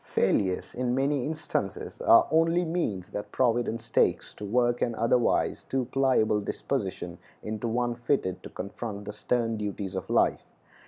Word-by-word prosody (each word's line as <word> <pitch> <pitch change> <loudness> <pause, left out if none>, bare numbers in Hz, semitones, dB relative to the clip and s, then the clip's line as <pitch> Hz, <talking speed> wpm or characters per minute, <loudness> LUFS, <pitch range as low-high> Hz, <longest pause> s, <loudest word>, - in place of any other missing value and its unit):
Failures 95 -2 +1
in 125 0 -1
many 135 0 +1
instances 150 -10 -3
are - - +6
only 165 +2 +3
means 160 - -2
that 105 0 -5
Providence 115 -2 0
takes - - +2
to - - -10
work 120 +3 +1
an 115 - 0
otherwise 115 +2 +2
too 130 -2 -1
pliable 125 -6 +2
disposition - - -3 0.2
into 110 +2 -3
one 120 +1 0
fitted 120 -6 -1
to - - -9
confront 100 +1 -6
the 105 - -5
stern 115 +1 0
duties 100 -2 -4
of 95 -2 -5
life. - - +3
120 Hz, 150 wpm, -28 LUFS, 105-130 Hz, 0.2 s, are